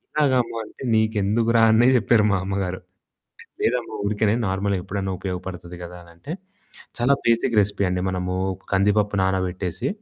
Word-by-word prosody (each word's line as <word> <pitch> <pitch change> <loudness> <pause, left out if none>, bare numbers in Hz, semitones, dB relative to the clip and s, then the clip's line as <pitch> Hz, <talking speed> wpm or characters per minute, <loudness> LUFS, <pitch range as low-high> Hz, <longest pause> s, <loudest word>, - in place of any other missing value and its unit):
ఎలాగమ్మా 130 -6 +2
అంటే, - - -12
"నీకెందుకురా" 110 +1 +2
అనే 120 +3 +5
చెప్పారు 115 -1 +3
మా 100 - +2
అమ్మగారు. 95 -1 -2 0.8
లేదమ్మా 115 -2 0
ఊరికేనే 105 +1 +1
నార్మల్‌గా 95 +1 0
ఎప్పుడైనా 95 0 -3
ఉపయోగపడుతుంది 90 -1 -6
కదా! 90 +1 -9
అనంటే. 85 - -11 0.7
చాలా 125 +4 +3
బేసిక్ 115 +1 +2
రెసిపీ 100 0 0
అండి 90 0 -1
మనము 90 0 -2 0.4
కందిపప్పు 105 +1 +2
నానబెట్టేసి, 95 -1 -1
100 Hz, 125 wpm, -23 LUFS, 95-115 Hz, 0.8 s, అనే